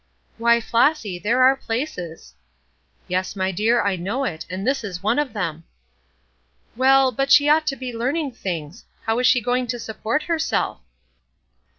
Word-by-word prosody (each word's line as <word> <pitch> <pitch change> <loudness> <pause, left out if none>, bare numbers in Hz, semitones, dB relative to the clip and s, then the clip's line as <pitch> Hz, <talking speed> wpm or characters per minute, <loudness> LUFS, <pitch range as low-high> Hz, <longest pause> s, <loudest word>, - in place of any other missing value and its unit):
"Why, 235 0 +4
Flossy, 230 - +1
there 240 +7 +2
are 265 +1 +6
places." 225 - -5 0.7
"Yes, 185 +2 -2
my 190 -1 -1
dear, 220 +6 +2
I 200 -1 +1
know 205 +10 -2
it, 160 -11 -4
and 185 +3 -4
this 270 -1 0
is 185 -3 -6
one 225 +7 +2
of 295 -3 -1
them." 165 -6 -3 1.1
"Well, 265 +1 +4
but 275 +1 -1
she 290 +1 +6
ought 305 +1 +3
to 275 - 0
be 255 -2 -6
learning 275 +5 -1
things. 175 -5 -6 0.2
How 225 +1 0
is 250 - +3
she 245 - +4
going 245 +2 0
to 240 +1 -3
support 225 +5 -3
herself?" 325 -1 -1
235 Hz, 165 wpm, -22 LUFS, 195-270 Hz, 1.1 s, are